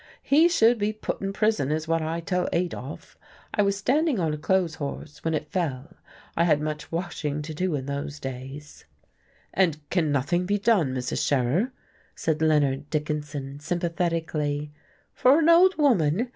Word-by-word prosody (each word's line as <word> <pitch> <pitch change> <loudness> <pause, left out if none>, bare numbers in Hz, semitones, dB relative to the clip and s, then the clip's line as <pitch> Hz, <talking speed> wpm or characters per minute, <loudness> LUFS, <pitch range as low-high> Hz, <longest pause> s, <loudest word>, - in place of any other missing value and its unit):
He 315 +5 +5
should 235 -8 +4
be 210 +1 0
put 215 - -4
in 195 0 -2
prison, 205 -9 +1
is 155 +1 -2
what 165 0 +1
I 165 +2 -2
tell 180 0 -1
Adolf. 170 -6 -4 0.3
I 210 - +2
was 200 -1 +1
standing 275 - +1
on 160 -3 0
a - - -3
clothes 180 0 +1
horse, 145 +1 -6
when 160 -1 0
it 150 0 -4
fell. 160 -3 -2 0.4
I 170 - +3
had 155 -3 +3
much 150 0 -4
washing 160 -4 -3
to 155 +1 -6
do 180 +1 -1
in 135 -2 -4
those 145 +1 -4
days." 135 +3 -8 0.7
"And 155 -6 +1
can 165 -5 +1
nothing 145 +6 0
be 205 +1 +2
done, 195 - +2
Mrs. 125 -1 -2
Scherer?" 145 - +1 0.5
asked 160 -1 -1
Leonard 145 -2 +2
Dickinson, 150 -2 -3
sympathetically. 165 -3 -2 0.4
"For 260 +3 +5
an 325 0 +3
old 360 +2 +6
woman? 230 - +2
160 Hz, 165 wpm, -26 LUFS, 145-195 Hz, 0.7 s, old